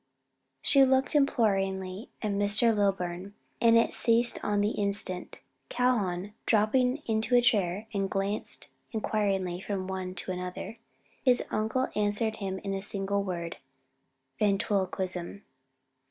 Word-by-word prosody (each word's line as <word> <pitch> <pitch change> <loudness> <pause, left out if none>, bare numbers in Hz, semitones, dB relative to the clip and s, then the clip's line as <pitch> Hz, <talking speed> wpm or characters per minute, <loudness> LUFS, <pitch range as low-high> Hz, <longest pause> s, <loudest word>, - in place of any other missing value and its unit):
She 275 -1 +5
looked 265 0 +2
imploringly 195 -8 +1
at 210 - 0
Mr. 205 +3 +2
Lilburn, 195 -1 -1 0.3
and 230 0 +6
it 230 - +2
ceased 235 +1 +2
on 205 0 0
the 205 +1 +1
instant. 200 -3 -2 0.3
Calhoun 205 -6 0
dropped 215 -1 +3
into 250 -3 +1
a 245 - +6
chair 205 -4 +2
and 195 -1 -1
glanced 195 +2 -1 0.2
inquiringly 195 -5 -1
from 190 -1 -3
one 185 -1 -4
to 185 - -3
another. 180 +5 -6 0.4
His 250 -2 +4
uncle 220 +5 0
answered 210 +1 0
him 195 -2 -3
in 195 -1 -2
a 195 - -2
single 200 0 +1
word, 170 -3 -4 0.8
"Ventriloquism." 195 -2 -1
205 Hz, 125 wpm, -29 LUFS, 190-225 Hz, 0.8 s, and